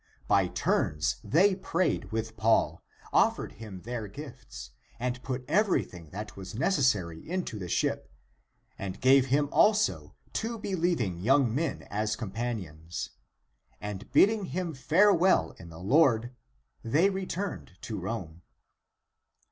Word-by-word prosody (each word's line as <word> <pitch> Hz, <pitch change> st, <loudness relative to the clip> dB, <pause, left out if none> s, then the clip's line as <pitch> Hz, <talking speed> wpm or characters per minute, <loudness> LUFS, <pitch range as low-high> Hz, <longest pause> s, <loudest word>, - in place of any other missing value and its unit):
By -, -, +4 dB
turns 75 Hz, 0 st, 0 dB
they 190 Hz, +6 st, +4 dB
prayed 185 Hz, -6 st, -1 dB
with 110 Hz, 0 st, -3 dB
Paul, 110 Hz, +1 st, +2 dB, 0.3 s
offered -, -, +2 dB
him 105 Hz, -4 st, -9 dB
their 115 Hz, -2 st, -4 dB
gifts, 140 Hz, +5 st, -10 dB, 0.3 s
and 125 Hz, +1 st, -2 dB
put 125 Hz, -1 st, -4 dB
everything 135 Hz, -, 0 dB
that 105 Hz, +4 st, -7 dB
was 95 Hz, +1 st, -8 dB
necessary 115 Hz, -, +1 dB
into 180 Hz, -, -3 dB
the 90 Hz, -, -5 dB
ship, -, -, -1 dB, 0.7 s
and 95 Hz, -1 st, -5 dB
gave 135 Hz, +1 st, +5 dB
him 145 Hz, +3 st, +2 dB
also 215 Hz, 0 st, +2 dB, 0.2 s
two 230 Hz, +1 st, -2 dB
believing 170 Hz, -, -1 dB
young 125 Hz, +3 st, +3 dB
men 155 Hz, +5 st, -2 dB
as 105 Hz, +1 st, 0 dB
com 110 Hz, -4 st, -6 dB
panions, 90 Hz, -8 st, -4 dB, 0.7 s
and 105 Hz, -1 st, -7 dB
bidding 210 Hz, -1 st, +4 dB
him 175 Hz, -1 st, -3 dB
farewell 180 Hz, +7 st, +4 dB
in 85 Hz, -, -11 dB
the 80 Hz, -, -11 dB
Lord 120 Hz, -, +3 dB, 0.5 s
they 155 Hz, -, +3 dB
returned 190 Hz, -, -4 dB
to 110 Hz, -3 st, -5 dB
Rome. 90 Hz, -4 st, -5 dB
120 Hz, 125 wpm, -29 LUFS, 100-170 Hz, 0.7 s, gave